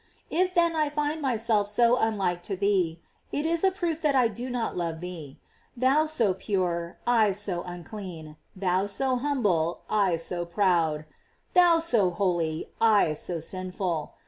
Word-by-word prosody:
* -, -, -36 dB
If 365 Hz, +2 st, +1 dB
then 340 Hz, -1 st, +3 dB
I 305 Hz, -2 st, +1 dB
find 300 Hz, +1 st, -2 dB
myself 225 Hz, -5 st, +1 dB
so 235 Hz, +3 st, +4 dB
unlike 195 Hz, -7 st, 0 dB
to 195 Hz, -, -1 dB
thee, 185 Hz, -4 st, +1 dB, 0.3 s
it 290 Hz, -, -2 dB
is 330 Hz, +1 st, 0 dB
a 385 Hz, -, +6 dB
proof 345 Hz, -4 st, -3 dB
that 295 Hz, -3 st, +2 dB
I 250 Hz, -3 st, +4 dB
do 240 Hz, +4 st, -6 dB
not 245 Hz, -2 st, -2 dB
love 165 Hz, -2 st, -3 dB
thee. 165 Hz, -6 st, -8 dB, 0.4 s
Thou 270 Hz, +5 st, +3 dB
so 235 Hz, -11 st, +2 dB
pure, 180 Hz, -3 st, -2 dB
I 225 Hz, -4 st, +3 dB
so 195 Hz, -3 st, -2 dB
unclean; 175 Hz, -3 st, -8 dB, 0.2 s
thou 185 Hz, +1 st, 0 dB
so 255 Hz, +5 st, 0 dB
hum 275 Hz, 0 st, -1 dB
ble, 170 Hz, -4 st, +1 dB
I 200 Hz, -5 st, +3 dB
so 175 Hz, +1 st, -3 dB
proud; 170 Hz, -4 st, +1 dB, 0.5 s
thou 350 Hz, -2 st, +6 dB
so 240 Hz, -, +2 dB
holy, 175 Hz, -4 st, -1 dB
I 210 Hz, -8 st, +4 dB
so 170 Hz, +2 st, -3 dB
sinful. 180 Hz, -1 st, -3 dB
205 Hz, 165 wpm, -27 LUFS, 175-260 Hz, 0.5 s, a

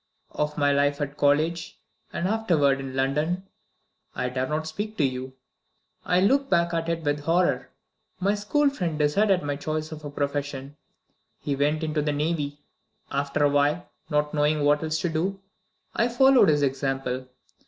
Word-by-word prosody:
Of 150 Hz, 0 st, -2 dB
my 145 Hz, -1 st, +3 dB
life 140 Hz, +1 st, +2 dB
at 145 Hz, -1 st, -3 dB
college, 155 Hz, +3 st, +1 dB, 0.3 s
and 175 Hz, -, -2 dB
afterward 170 Hz, -11 st, +2 dB
in 135 Hz, -1 st, -6 dB
London, 150 Hz, +8 st, 0 dB, 0.7 s
I 125 Hz, 0 st, -1 dB
dare 130 Hz, +1 st, -2 dB
not 155 Hz, +2 st, -2 dB
speak 205 Hz, +7 st, -5 dB
to 155 Hz, -, +2 dB
you; 130 Hz, -1 st, -2 dB, 0.7 s
I 180 Hz, 0 st, +2 dB
look 275 Hz, +7 st, +3 dB
back 170 Hz, 0 st, +2 dB
at 165 Hz, 0 st, -1 dB
it 165 Hz, -1 st, -2 dB
with 145 Hz, 0 st, 0 dB
horror. 170 Hz, +4 st, +1 dB, 0.5 s
My 195 Hz, +2 st, +2 dB
school 275 Hz, +8 st, +1 dB
friend 175 Hz, -, -3 dB
decided 180 Hz, +5 st, +2 dB
my 145 Hz, -1 st, -2 dB
choice 155 Hz, +2 st, -3 dB
of 155 Hz, -1 st, -8 dB
a 145 Hz, -, -5 dB
profession; 140 Hz, -1 st, -3 dB, 0.6 s
he 145 Hz, -, -2 dB
went 150 Hz, +3 st, 0 dB
into 155 Hz, -1 st, 0 dB
the 150 Hz, 0 st, 0 dB
navy. 145 Hz, -1 st, -2 dB, 0.5 s
After 140 Hz, +1 st, 0 dB
a 145 Hz, -, +5 dB
while, 145 Hz, +4 st, +1 dB, 0.2 s
not 150 Hz, -1 st, 0 dB
knowing 150 Hz, 0 st, +2 dB
what 145 Hz, 0 st, +3 dB
else 160 Hz, 0 st, -1 dB
to 175 Hz, -, 0 dB
do, 180 Hz, +5 st, -1 dB, 0.6 s
I 235 Hz, -, +3 dB
followed 260 Hz, -2 st, +5 dB
his 145 Hz, -1 st, +3 dB
example. 135 Hz, -1 st, -1 dB
150 Hz, 165 wpm, -25 LUFS, 145-170 Hz, 0.7 s, a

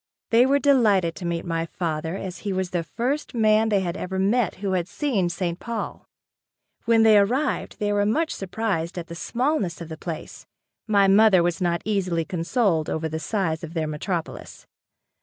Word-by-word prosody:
They 235 Hz, +3 st, +5 dB
were 280 Hz, +1 st, +4 dB
delighted 215 Hz, -, +3 dB
to 175 Hz, -, -4 dB
meet 170 Hz, -1 st, -2 dB
my 165 Hz, -1 st, -2 dB
father 160 Hz, 0 st, -3 dB
as 190 Hz, -2 st, -6 dB
he 205 Hz, -, -3 dB
was 185 Hz, -1 st, -2 dB
the 175 Hz, -, 0 dB
first 245 Hz, -, -3 dB
man 220 Hz, -1 st, +3 dB
they 200 Hz, -2 st, +2 dB
had 175 Hz, -2 st, -3 dB
ever 190 Hz, +1 st, -4 dB
met 205 Hz, +2 st, +1 dB
who 195 Hz, 0 st, -3 dB
had 180 Hz, -2 st, 0 dB
seen 205 Hz, -, 0 dB
St. 175 Hz, 0 st, -3 dB
Paul. 235 Hz, -2 st, -5 dB, 0.8 s
When 225 Hz, -1 st, +4 dB
they 215 Hz, -2 st, +7 dB
arrived, 255 Hz, +8 st, 0 dB
they 205 Hz, -1 st, 0 dB
were 205 Hz, 0 st, +2 dB
much 305 Hz, +11 st, +1 dB
surprised 190 Hz, -4 st, -3 dB
at 175 Hz, -, -4 dB
the -, -, -6 dB
smallness 235 Hz, -, -1 dB
of 170 Hz, -1 st, -8 dB
the 160 Hz, -, -7 dB
place. 160 Hz, -1 st, -7 dB, 0.4 s
My 200 Hz, -2 st, +4 dB
mother 195 Hz, -2 st, +6 dB
was 175 Hz, +2 st, -1 dB
not 170 Hz, -1 st, 0 dB
easily 185 Hz, -6 st, 0 dB
consoled 170 Hz, -1 st, 0 dB
over 160 Hz, 0 st, -2 dB
the 160 Hz, 0 st, -4 dB
size 165 Hz, -1 st, -2 dB
of 165 Hz, +1 st, -8 dB
their 160 Hz, -1 st, 0 dB
metropolis. 160 Hz, +3 st, -5 dB
190 Hz, 185 wpm, -24 LUFS, 170-220 Hz, 0.8 s, they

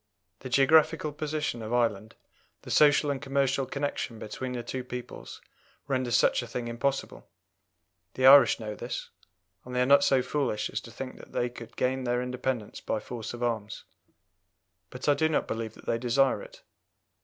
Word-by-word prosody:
The 130 Hz, -, -8 dB
geographical 150 Hz, +3 st, +4 dB
position 150 Hz, -5 st, -3 dB
of 110 Hz, +1 st, -6 dB
Ireland, 110 Hz, -2 st, 0 dB, 0.5 s
the -, -, -8 dB
social 145 Hz, -1 st, +5 dB
and 135 Hz, -2 st, -4 dB
commercial 135 Hz, -1 st, 0 dB
connection 140 Hz, -4 st, -3 dB
between 125 Hz, +4 st, -5 dB
the 120 Hz, -1 st, -4 dB
two 130 Hz, +2 st, -4 dB
peoples, 125 Hz, -1 st, -8 dB, 0.5 s
renders 130 Hz, -3 st, 0 dB
such 130 Hz, -, +3 dB
a 120 Hz, -, -7 dB
thing 120 Hz, 0 st, -4 dB
impossible. 135 Hz, +4 st, -3 dB, 0.9 s
The 130 Hz, -, +1 dB
Irish 135 Hz, -3 st, +8 dB
know 105 Hz, -2 st, -5 dB
this, -, -, -6 dB, 0.5 s
and 125 Hz, 0 st, -8 dB
they 125 Hz, -, +2 dB
are -, -, +1 dB
not 140 Hz, +1 st, +6 dB
so 130 Hz, -2 st, +3 dB
foolish 125 Hz, -5 st, -1 dB
as -, -, -3 dB
to -, -, -12 dB
think -, -, -7 dB
that -, -, -14 dB
they 120 Hz, -, 0 dB
could 115 Hz, -1 st, -11 dB
gain 130 Hz, +1 st, 0 dB
their 125 Hz, 0 st, 0 dB
independence 125 Hz, -3 st, -3 dB
by 110 Hz, -, -2 dB
force 115 Hz, 0 st, -7 dB
of 120 Hz, -, -6 dB
arms; 110 Hz, -3 st, -3 dB, 1.1 s
but 125 Hz, +3 st, -7 dB
I 145 Hz, -, +6 dB
do 155 Hz, +2 st, +1 dB
not 155 Hz, -, 0 dB
believe 110 Hz, -1 st, -4 dB
that -, -, -16 dB
they 115 Hz, -, 0 dB
desire 125 Hz, +3 st, +2 dB
it. -, -, -13 dB
125 Hz, 180 wpm, -28 LUFS, 120-140 Hz, 1.1 s, Irish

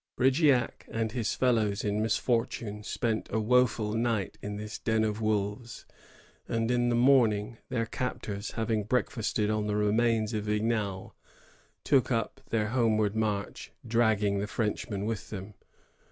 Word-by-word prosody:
Brigeac 130 Hz, -1 st, +2 dB
and 115 Hz, -1 st, -2 dB
his 115 Hz, -2 st, -1 dB
fellows 110 Hz, -5 st, +1 dB
in 105 Hz, 0 st, 0 dB
misfortune 115 Hz, -2 st, -1 dB
spent 110 Hz, +1 st, -2 dB
a 110 Hz, -, +1 dB
wo 125 Hz, +3 st, +4 dB
ful 105 Hz, -2 st, -4 dB
night 115 Hz, -3 st, 0 dB
in 105 Hz, 0 st, -5 dB
this 105 Hz, +1 st, -6 dB
den 110 Hz, -1 st, +1 dB
of 110 Hz, 0 st, -1 dB
wolves; 110 Hz, +2 st, -2 dB, 0.6 s
and 115 Hz, +1 st, 0 dB
in 120 Hz, 0 st, +2 dB
the 120 Hz, -, +2 dB
morning 120 Hz, -3 st, +3 dB
their 120 Hz, -3 st, 0 dB
captors, 105 Hz, -4 st, -4 dB
having 110 Hz, -2 st, 0 dB
breakfasted 110 Hz, -2 st, 0 dB
on 105 Hz, -1 st, -1 dB
the 105 Hz, -, 0 dB
remains 110 Hz, +1 st, +2 dB
of 105 Hz, -1 st, -2 dB
Vignal, 105 Hz, -2 st, -1 dB, 0.7 s
took 135 Hz, -3 st, +3 dB
up 115 Hz, -2 st, -1 dB
their 110 Hz, -2 st, 0 dB
homeward 110 Hz, -4 st, +2 dB
march, 105 Hz, -2 st, -2 dB, 0.2 s
dragging 110 Hz, -3 st, +2 dB
the 100 Hz, -, -2 dB
Frenchmen 105 Hz, -2 st, -2 dB
with 110 Hz, -3 st, -4 dB
them. 100 Hz, 0 st, -7 dB
110 Hz, 145 wpm, -29 LUFS, 105-120 Hz, 0.7 s, wo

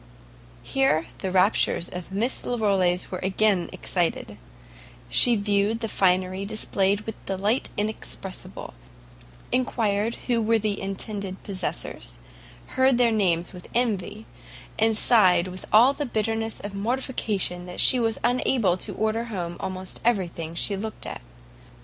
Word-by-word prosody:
Here 270 Hz, -12 st, +1 dB
the 190 Hz, -, -3 dB
raptures 185 Hz, -2 st, +3 dB
of 180 Hz, +1 st, -8 dB
Miss 225 Hz, +7 st, 0 dB
Larolles 195 Hz, -6 st, +1 dB
were 185 Hz, -, -3 dB
again 190 Hz, -1 st, +1 dB
excited: 165 Hz, -, -2 dB, 0.7 s
she 240 Hz, -1 st, +5 dB
viewed 205 Hz, +1 st, +1 dB
the 225 Hz, -, -1 dB
finery 185 Hz, -1 st, +1 dB
displayed 200 Hz, -1 st, +1 dB
with 220 Hz, 0 st, -8 dB
delight 200 Hz, +6 st, 0 dB
inexpressible, 205 Hz, -2 st, -5 dB, 0.8 s
enquired 225 Hz, -3 st, 0 dB
who 240 Hz, -2 st, +1 dB
were 225 Hz, +1 st, +3 dB
the 210 Hz, -2 st, -1 dB
intended 195 Hz, 0 st, -5 dB
possessors, 190 Hz, -2 st, -4 dB, 0.5 s
heard 260 Hz, -1 st, +2 dB
their 240 Hz, -1 st, +4 dB
names 180 Hz, -6 st, +1 dB
with 180 Hz, -1 st, -11 dB
envy, 215 Hz, -3 st, -1 dB, 0.5 s
and 220 Hz, 0 st, +3 dB
sighed 185 Hz, -7 st, +5 dB
with 185 Hz, +1 st, -8 dB
all 240 Hz, +6 st, +6 dB
the 290 Hz, -1 st, -3 dB
bitterness 225 Hz, 0 st, -2 dB
of 205 Hz, 0 st, -7 dB
mortification 205 Hz, -5 st, -2 dB
that 180 Hz, -, -8 dB
she 255 Hz, -, +6 dB
was 225 Hz, -2 st, 0 dB
unable 240 Hz, -6 st, +2 dB
to -, -, -6 dB
order 220 Hz, +2 st, -1 dB
home 175 Hz, -7 st, -4 dB
almost 185 Hz, 0 st, -5 dB
everything 170 Hz, -7 st, -1 dB
she 200 Hz, +4 st, +1 dB
looked 215 Hz, +2 st, -6 dB
at. -, -, -6 dB
205 Hz, 130 wpm, -25 LUFS, 185-225 Hz, 0.8 s, all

